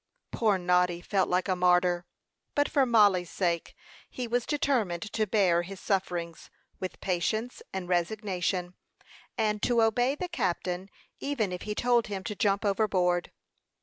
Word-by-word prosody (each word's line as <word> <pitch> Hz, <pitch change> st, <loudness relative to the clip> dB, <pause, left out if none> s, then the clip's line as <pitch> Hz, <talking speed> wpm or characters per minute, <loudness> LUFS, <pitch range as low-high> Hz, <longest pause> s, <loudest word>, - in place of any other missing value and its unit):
Poor 215 Hz, -4 st, +2 dB
Noddy 180 Hz, -1 st, +2 dB
felt 190 Hz, +1 st, 0 dB
like 180 Hz, +2 st, +1 dB
a 185 Hz, -, +1 dB
martyr; 180 Hz, -1 st, +2 dB, 0.5 s
but 290 Hz, 0 st, +3 dB
for 275 Hz, -3 st, +2 dB
Mollie's 205 Hz, -7 st, +4 dB
sake, 170 Hz, -3 st, -1 dB, 0.3 s
he 250 Hz, -1 st, -5 dB
was 240 Hz, +1 st, -1 dB
determined 240 Hz, -, 0 dB
to 215 Hz, -1 st, 0 dB
bear 185 Hz, -5 st, +3 dB
his 190 Hz, +2 st, -8 dB
sufferings 175 Hz, -4 st, -2 dB, 0.3 s
with 185 Hz, -, -5 dB
patience 215 Hz, +7 st, -1 dB
and 190 Hz, -2 st, -4 dB
resignation, 180 Hz, 0 st, -1 dB, 0.6 s
and 210 Hz, -2 st, 0 dB
to 235 Hz, -2 st, +3 dB
obey 245 Hz, +5 st, +2 dB
the 360 Hz, +4 st, -4 dB
captain, 185 Hz, -, -2 dB, 0.3 s
even 250 Hz, -9 st, -1 dB
if 180 Hz, -, -5 dB
he 210 Hz, 0 st, -4 dB
told 240 Hz, 0 st, +2 dB
him 195 Hz, -2 st, -4 dB
to 210 Hz, -, -4 dB
jump 200 Hz, +1 st, +1 dB
overboard. 185 Hz, -4 st, +1 dB
195 Hz, 150 wpm, -28 LUFS, 180-225 Hz, 0.6 s, Mollie's